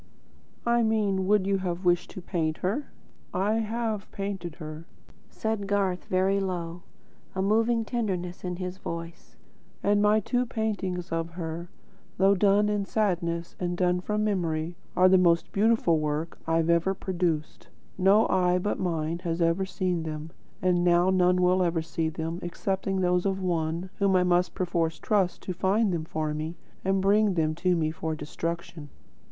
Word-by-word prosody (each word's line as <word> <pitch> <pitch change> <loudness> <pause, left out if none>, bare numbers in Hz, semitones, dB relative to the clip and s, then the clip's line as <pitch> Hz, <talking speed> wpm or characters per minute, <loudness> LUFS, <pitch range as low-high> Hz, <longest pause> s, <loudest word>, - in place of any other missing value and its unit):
"I 235 0 +3
mean, 205 -4 +1
would 205 -1 +3
you 195 0 +1
have 180 0 -3
wished 175 0 +2
to 185 - -9
paint 160 -4 -1
her?" 260 +10 -1 0.5
"I 205 +4 +2
HAVE 220 -2 -2
painted 190 -5 -4
her," 155 0 -8 0.4
said 220 -2 -3
Garth 195 -3 0
very 190 +2 +2
low, 175 -3 -3 0.5
a 190 - 0
moving 225 +3 +2
tenderness 185 -7 -3
in 180 -1 -3
his 185 +1 -5
voice; 165 -1 -7 0.5
"and 205 0 +3
my 210 +1 +4
two 245 +4 0
paintings 190 -6 -2
of 165 0 -2
her, 170 0 -5 0.5
though 195 +1 +5
done 200 +1 +3
in 205 -1 0
sadness 175 -5 -1
and 175 -1 -2
done 180 0 +2
from 210 +3 -1
memory, 170 -5 -1 0.2
are 185 - +7
the 185 0 +6
most 170 -2 +3
beautiful 205 -6 +3
work 155 +2 -2
I 165 0 +2
ever 170 +3 +2
produced. 175 -5 -2 0.3
No 195 +4 +5
eye 180 -1 +3
but 195 +3 -1
my 165 -4 -1
own 170 - -3
has 170 -1 -3
ever 170 +3 +2
seen 180 -3 -1
them, 155 0 -5 0.3
and 180 -1 +3
now 175 +1 +4
none 180 -1 +4
ever 180 0 +3
will - - +1
see 160 0 -2
them, 160 +2 -4
excepting 190 +2 -2
those 180 +1 +2
of 190 -1 -1
one 170 0 -1
whom 200 -1 +3
I 180 - +4
must 180 0 +2
perforce 170 -3 0
trust 195 -2 0
to 185 - -3
find 195 +3 +1
them 160 -2 -2
for 155 -1 -2
me, 155 +2 -4 0.3
and 195 0 +1
bring 205 0 +3
them 155 -2 +1
to 180 +2 +1
me 155 -2 0
for 160 0 -3
destruction." 165 0 -5
180 Hz, 170 wpm, -27 LUFS, 170-195 Hz, 0.5 s, are